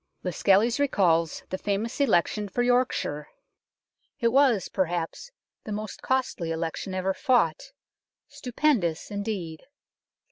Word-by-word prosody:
Lascelles 200 - +2
recalls 170 - +2
the 185 - -3
famous 210 +6 -2
election 210 -3 +1
for 245 +5 0
York 245 +1 +3
shire. 150 0 -4 0.9
It 235 -3 +3
was, 250 -6 +3
perhaps, 175 - -2 0.3
the 215 - -7
most 210 0 -5
costly 260 -10 -1
election 165 +3 -3
ever 190 +1 0
fought 245 - +1 0.6
stupendous, 250 - -1
indeed. 200 -6 -4
205 Hz, 110 wpm, -26 LUFS, 175-245 Hz, 0.9 s, York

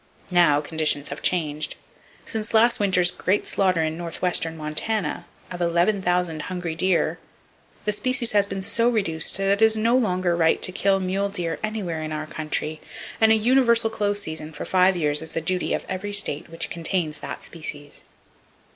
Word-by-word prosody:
Now, 165 -5 +4
conditions 150 -2 0
have - - -7
changed. 155 -4 -1 0.5
Since 220 +1 -2
last 235 +2 +4
winter's 180 -3 +2
great 195 +3 0
slaughter 185 -4 +1
in 160 +1 -3
northwestern 170 -1 -1
Montana, 155 +4 -2 0.2
of 180 -1 -6
11,000 175 -1 +1
hungry 180 -2 -4
deer, 180 +2 +1 0.7
the 210 - +2
species 250 +2 0
has 205 -1 +3
been 195 -1 -4
so 230 +4 +4
reduced 190 -10 0
that 195 0 -1
it 200 +2 +2
is 220 0 +5
no 230 +3 +2
longer 185 -7 +1
right 165 -1 +3
to - - +3
kill 195 +1 +2
mule 190 +2 -1
deer 175 -4 -4
anywhere 205 -7 -3
in 155 0 -5
our 155 0 -3
country, 155 0 -3 0.4
and 220 0 +6
a - - +6
universal 235 0 +3
close 205 -2 0
season 160 -3 -5
for 150 - -6
five 185 0 +3
years 150 -2 +2
is 160 0 -6
the - - +1
duty 180 +3 -1
of - - -2
every 190 +2 -4
state 175 -6 0
which 165 0 -4
contains 170 -2 -2
that - - -7
species. 145 -3 -8
180 Hz, 175 wpm, -24 LUFS, 160-205 Hz, 0.7 s, and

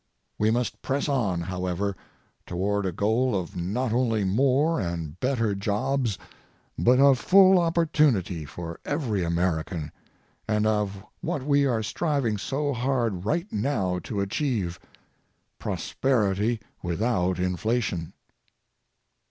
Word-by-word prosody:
We 105 - +3
must 120 +2 -1
press 140 +3 -1
on, 105 - 0
however, 90 +2 -2 0.5
toward 100 +3 -1
a - - -1
goal 110 +4 +1
of 85 - -7
not 110 +8 -1
only 115 -4 +1
more 135 - +2
and 85 -3 -4
better 115 -5 +1
jobs 105 +3 -1 0.6
but 125 +2 +4
of 135 -2 +6
full 190 +6 +6
opportunity 150 - +2
for 85 +3 -7
every 120 - -1
American 85 -2 -1 0.6
and 105 -1 +1
of 105 -3 0 0.2
what 140 - -2
we 140 -1 +3
are 115 -4 0
striving 125 -3 -1
so 140 +5 -1
hard 120 -7 -1
right 170 - 0
now 100 -6 0
to 100 -2 -2
achieve, 100 - -1 0.8
prosperity 110 -3 0 0.2
without 90 0 0
inflation. 90 -1 -1
110 Hz, 115 wpm, -26 LUFS, 90-130 Hz, 0.8 s, of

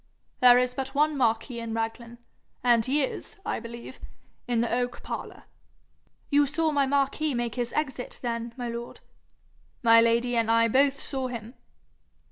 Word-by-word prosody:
There 245 -1 +8
is 250 0 +1
but 270 +1 -4
one 300 +1 +3
marquis 235 -1 0
in 230 -1 -4
Raglan, 230 +1 -4 0.5
and 240 -2 +4
he 275 +5 +1
is, 270 - -5
I - - -2
believe, 235 +2 -9 0.5
in 240 -2 +1
the 235 - -1
oak 245 0 -2
parlour.' - - -6 0.9
'You 285 0 +4
saw 315 +3 +1
my 285 -2 +2
Marquis 280 +1 0
make 240 -2 -2
his 240 -1 -2
exit 265 -4 -3
then, 235 -1 -3
my 245 -1 -4
lord?' 235 0 -6 0.8
'My 230 -1 +7
lady 235 +1 +2
and 230 -1 +1
I 230 0 +4
both 275 +3 +3
saw 265 -2 -2
him.' 235 -1 -7
245 Hz, 160 wpm, -27 LUFS, 230-270 Hz, 0.9 s, There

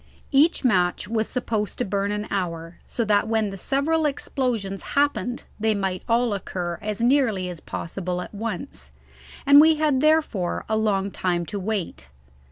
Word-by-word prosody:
Each 290 +1 +3
match 185 -4 +2
was 220 0 0
supposed 220 -5 -2
to 250 - -1
burn 200 0 -1
an 210 0 -2
hour, 170 -3 -3
so 230 - -2
that 205 0 +2
when 220 -2 0
the - - -6
several 300 - +1
explosions 245 -8 -2 0.2
happened 280 -4 +1 0.2
they 220 0 +2
might 190 -2 -2
all 235 -1 +2
occur 175 -3 -4
as 215 +1 -4
nearly 235 -8 +2
as 175 -2 -7
possible 180 +2 -4
at 180 - -7
once, 175 - -5 0.5
and 280 +1 +9
we 320 +1 +6
had 300 -4 +1
therefore 305 - +1
a 220 - 0
long 200 -3 +1
time 175 -2 -1
to 200 +5 -4
wait. 180 - -4
210 Hz, 165 wpm, -24 LUFS, 185-250 Hz, 0.5 s, and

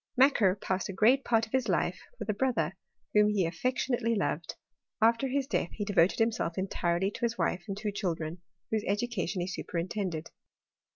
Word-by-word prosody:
Macquer 245 -8 +5
passed 190 0 -2
a - - -3
great 240 +8 +4
part 225 -1 +2
of 220 - -20
his 260 -3 +1
life 180 0 +1 0.2
with 215 -3 -6
a 215 - +1
bro 260 +5 +1
ther, 165 -3 0 0.4
whom 210 0 +5
he 200 -4 +2
affectionately 240 +5 0
loved: 170 -5 -2 0.4
after 230 +4 +3
his 270 +1 0
death 265 -10 -1
he 205 - -3
devoted 195 -3 +3
himself 225 -7 0
entirely 190 0 0
to - - -9
his 235 -1 0
wife 180 - 0
and 195 -1 -4
two 210 0 -2
chil 190 -4 -1
dren, 160 +2 -5 0.3
whose 220 -1 +1
education 200 -3 -1
he 175 - -2
superintended. 175 -2 -3
205 Hz, 185 wpm, -30 LUFS, 180-230 Hz, 0.4 s, Macquer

